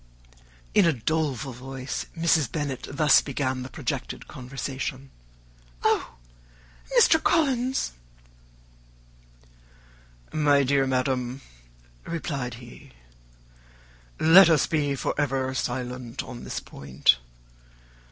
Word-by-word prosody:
In 200 -4 +5
a 165 - +3
doleful 135 -1 -2
voice 130 +1 -6
Mrs. 160 -6 +2
Bennet 145 -4 -3
thus 150 +1 +5
began 130 -2 -2
the 130 - -7
projected - - -5
conversation: 135 +1 -6 0.7
"Oh, - - +1 0.8
Mr. 325 -9 +6
Collins!" 265 -5 +1 2.4
"My 145 -2 +3
dear 135 0 +2
madam," 130 0 -1 0.6
replied 140 -7 -4
he, 120 - -14 1.3
"let 170 +3 +8
us 155 -4 +4
be 145 -3 0
for - - -2
ever 135 -2 0
silent 125 -1 -4
on 120 -2 -9
this - - -4
point. 65 -2 +1
135 Hz, 95 wpm, -26 LUFS, 125-155 Hz, 2.4 s, let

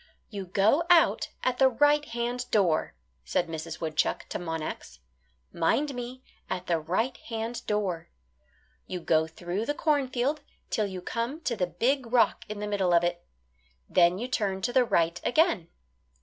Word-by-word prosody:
"You 200 -3 -5
go 205 - +3
out 345 -2 +5
at 250 -1 0
the 265 -1 +6
right 290 +4 +3
hand 240 0 -3
door," 180 - +2 0.3
said 120 - 0
Mrs. 165 0 -6
Woodchuck 155 -2 -1
to - - -3
Monax; 160 - -5 0.6
"mind 275 - +1
me, 250 +1 -7 0.3
at 180 -1 -3
the 170 -2 +1
right 190 +11 -1
hand 225 +1 -5
door. 195 -6 -1 0.8
You 180 - -4
go 160 -1 +2
through 175 +7 -4
the 290 - 0
cornfield 285 -1 0 0.3
'till 215 -4 +1
you 185 -2 -7
come 235 - -3
to 245 -6 -1
the 185 -4 0
big 250 +5 0
rock 240 -3 +3
in 210 -1 -5
the 210 - -3
middle 190 -4 +2
of 170 - +4
it. 175 0 -1 0.6
Then 175 0 +4
you 240 +5 -3
turn 195 -6 -1
to 245 - 0
the 255 -2 +5
right 170 -4 +1
again." 245 - +2
210 Hz, 165 wpm, -28 LUFS, 175-250 Hz, 0.8 s, the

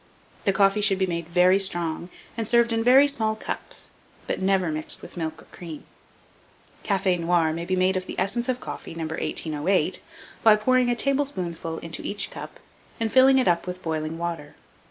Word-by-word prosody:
The 200 - +4
coffee 195 +1 +3
should 200 -2 +4
be 190 - +1
made 170 -2 -4
very 180 +2 +4
strong, 175 -3 +1 0.3
and 225 -2 -3
served 235 0 +3
in 225 0 0
very 265 +4 +6
small 220 -6 +2
cups, - - -5 0.3
but - - -3
never 190 -3 +1
mixed 155 0 -1
with - - -11
milk 160 -2 -5
or - - -22
cream. 165 -4 -9 1.0
Cafe 195 -3 +1
noir 170 -2 +1
may 170 +1 -4
be 185 - -1
made 185 +1 +2
of 185 0 -3
the - - -5
essence 235 +7 -1
of 250 -1 0
coffee 165 - -8
No. 165 - -4
1808, 160 +2 -1 0.4
by 220 -2 +7
pouring 250 +3 +2
a 240 - +1
tablespoonful 190 - -2
into 165 0 -5
each 205 0 -2
cup, - - -9 0.4
and 225 -1 -2
filling 265 +1 +6
it 260 - +2
up 175 0 +1
with 180 0 -6
boiling 160 0 -3
water. 165 -3 -5
185 Hz, 185 wpm, -24 LUFS, 170-220 Hz, 1.0 s, by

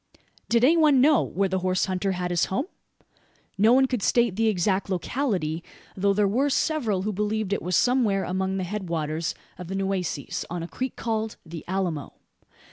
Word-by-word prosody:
Did 235 0 +3
any 315 +6 +5
one 300 -4 +5
know 290 +3 +5
where 195 +1 -1
the 190 0 -1
horse 185 0 +1
hunter 190 +1 -1
had 180 -1 -3
his 175 -2 +2
home? 260 +10 -2 0.9
No 215 +3 +4
one 265 +2 +6
could 250 -4 -2
state 235 -1 +2
the 225 +2 +2
exact 195 -1 +1
locality; 180 - -1 0.3
though 200 +1 +2
there 205 0 +3
were 260 +8 +1
several 245 -10 0
who 210 +1 -2
believed 210 0 -1
it - - -1
was 180 0 -1
somewhere 235 -6 +2
among 190 +1 -1
the 190 - -2
head 190 0 -4
waters 160 0 -2 0.2
of 180 - -7
the 190 - -4
Nueces, 190 -6 -2
on 175 -1 -4
a - - -5
creek 255 +7 -4
called 220 -1 -2
the 165 -1 -8
"Alamo." 175 -6 -2
195 Hz, 190 wpm, -25 LUFS, 180-225 Hz, 0.9 s, one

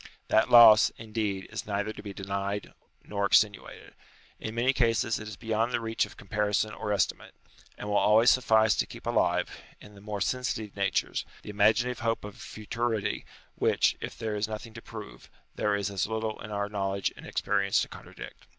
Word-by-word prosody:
That 110 - +3
loss, 115 -3 +9
indeed, 105 -4 -3
is 105 -3 -5
neither 105 +1 -2
to - - -10
be 100 - -7
denied 100 +1 -4 0.3
nor 100 -1 -1
extenu 105 -1 +3
ated. - - -14 0.5
In 110 +1 -6
many 125 +3 +2
cases 115 -3 +1
it 105 - -8
is 105 - -7
beyond 115 +1 -1
the - - 0
reach 115 -1 -1
of - - -16
com 100 - -14
parison 105 +1 0
or 105 - -4
estimate; 100 -4 -1 0.4
and - - -7
will 105 0 +1
always 110 +3 +5
suffice 110 -4 +4
to - - +1
keep - - -11
alive, - - 0 0.2
in 105 - -14
the 100 - -15
more 105 0 -5
sensitive 110 -2 -2
natures, 100 -1 0 0.2
the - - -7
imaginative 110 +4 +2
hope 115 -1 -1
of 105 - -8
a - - -19
futurity 110 -1 -3 0.3
which, - - +2
if - - -6
there 110 -1 -3
is 105 0 -1
nothing 110 +1 -7
to 115 - -9
prove, 110 -3 -10 0.2
there 105 -1 0
is 100 0 -2
as 100 -1 -1
little 110 0 -3
in 110 - -8
our 100 -1 -2
knowledge 100 -1 -2
and - - -11
experience 100 -1 +1
to - - -6
contradict. - - -11
105 Hz, 195 wpm, -28 LUFS, 100-115 Hz, 0.5 s, loss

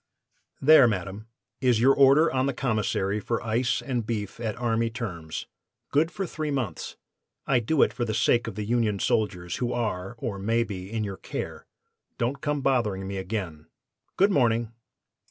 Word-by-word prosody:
"'There, 145 -3 +8
madam, 100 +1 -3 0.3
is 125 -4 +3
your 130 +4 +6
order 140 +4 +5
on 130 +1 +1
the 140 - -2
Commissary 105 -5 0
for 115 +2 -2
ice 120 +2 0
and 120 -5 -2
beef 105 -2 -3
at 110 -3 -2
army 115 -1 0
terms, 90 -9 -5 0.5
good 155 +3 +3
for 195 +1 -4
three 155 -2 -4
months. 125 - -3 0.5
I 130 -3 +3
do 135 +6 +3
it - - +1
for 120 - -2
the 110 -2 -2
sake 120 +2 +2
of 110 - -5
the 105 - -3
Union 115 -2 +1
Soldiers 90 -4 -1
who 125 -1 -1
are, 105 -3 -2
or 110 -5 -4
may 115 +4 +1
be, 95 -3 -7
in 110 -1 -1
your 100 -2 -4
care. - - -6 0.5
Don't 130 +4 -1
come 145 -1 -1
bothering 110 -8 0
me 100 0 -4
again. 95 -6 -4 0.5
Good 200 +2 +4
morning! 115 - +2
115 Hz, 175 wpm, -26 LUFS, 100-130 Hz, 0.5 s, There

